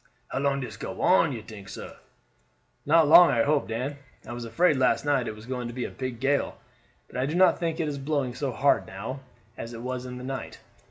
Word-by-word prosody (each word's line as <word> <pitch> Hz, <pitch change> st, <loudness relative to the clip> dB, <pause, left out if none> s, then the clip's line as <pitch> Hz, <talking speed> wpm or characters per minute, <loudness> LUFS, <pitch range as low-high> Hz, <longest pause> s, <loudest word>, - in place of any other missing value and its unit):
"How 130 Hz, -, -2 dB
long 140 Hz, 0 st, +1 dB
dis 110 Hz, -4 st, -7 dB
go -, -, -6 dB
on, 170 Hz, -4 st, +5 dB
you 115 Hz, -5 st, -6 dB
tink, 105 Hz, -3 st, -11 dB
sah?" -, -, -9 dB, 0.9 s
"Not 160 Hz, 0 st, +5 dB
long, 170 Hz, +3 st, +9 dB
I 115 Hz, -, +3 dB
hope, 145 Hz, 0 st, +1 dB
Dan. 125 Hz, +6 st, -3 dB, 0.3 s
I 120 Hz, -, -7 dB
was 120 Hz, 0 st, -6 dB
afraid 150 Hz, +7 st, +2 dB
last 130 Hz, +2 st, +2 dB
night 140 Hz, -4 st, +1 dB
it 110 Hz, -, -4 dB
was 110 Hz, +1 st, -12 dB
going 125 Hz, -1 st, -4 dB
to 120 Hz, -, -8 dB
be 125 Hz, -, -2 dB
a -, -, -6 dB
big 130 Hz, -3 st, -5 dB
gale, 140 Hz, +2 st, 0 dB, 0.5 s
but -, -, -9 dB
I 130 Hz, +1 st, 0 dB
do 155 Hz, -, -2 dB
not 185 Hz, 0 st, +5 dB
think 165 Hz, 0 st, -2 dB
it 160 Hz, -, 0 dB
is 145 Hz, -2 st, -3 dB
blowing 135 Hz, -3 st, -1 dB
so 135 Hz, +1 st, -2 dB
hard 140 Hz, +3 st, +2 dB
now 110 Hz, +8 st, -6 dB, 0.4 s
as 115 Hz, +1 st, -6 dB
it 115 Hz, 0 st, -8 dB
was 130 Hz, 0 st, -4 dB
in 125 Hz, 0 st, -7 dB
the 125 Hz, -, -8 dB
night." 135 Hz, 0 st, -6 dB
130 Hz, 235 wpm, -27 LUFS, 120-145 Hz, 0.9 s, long